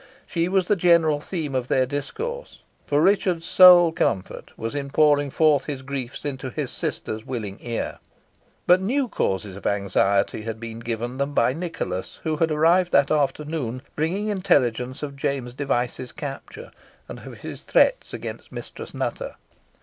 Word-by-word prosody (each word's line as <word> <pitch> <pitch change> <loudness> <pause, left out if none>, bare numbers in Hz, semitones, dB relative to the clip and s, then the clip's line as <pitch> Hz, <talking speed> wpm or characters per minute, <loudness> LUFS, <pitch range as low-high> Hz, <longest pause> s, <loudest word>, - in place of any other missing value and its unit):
She 170 0 -1
was 185 -1 +1
the 210 - +3
general 170 -4 +4
theme 155 -5 -4
of 130 -2 -1
their 130 0 +2
discourse, 455 - -5 0.2
for 145 +1 +2
Richard's 185 -4 +2
sole 175 -2 +8
comfort 95 - -2
was 115 0 -4
in 140 -1 -3
pouring 145 -1 +3
forth 150 -1 +3
his 140 -3 -5
griefs 130 -1 -5
into 130 -2 -4
his - - -4
sister's 110 0 -4
willing 110 -6 -5
ear; 120 -1 -4 0.7
but 180 +1 +5
new 255 +7 0
causes 95 - -2
of 100 - -5
anxiety 100 +1 +1
had 115 0 -5
been 115 0 -7
given 120 +2 -4
them 140 +1 -2
by 120 +2 +3
Nicholas, 140 - -5
who 155 -1 -1
had 165 +1 +2
arrived 170 +4 +3
that 140 - +4
afternoon, 145 -3 -1
bringing 185 +8 -1
intelligence 135 - +1
of 140 -1 -5
James 135 -3 -2
Device's 125 -2 -2
capture, 140 -2 -8 0.4
and - - -8
of - - -10
his - - -7
threats - - +2
against - - -7
Mistress - - -8
Nutter. - - -3
145 Hz, 155 wpm, -24 LUFS, 120-170 Hz, 0.7 s, sole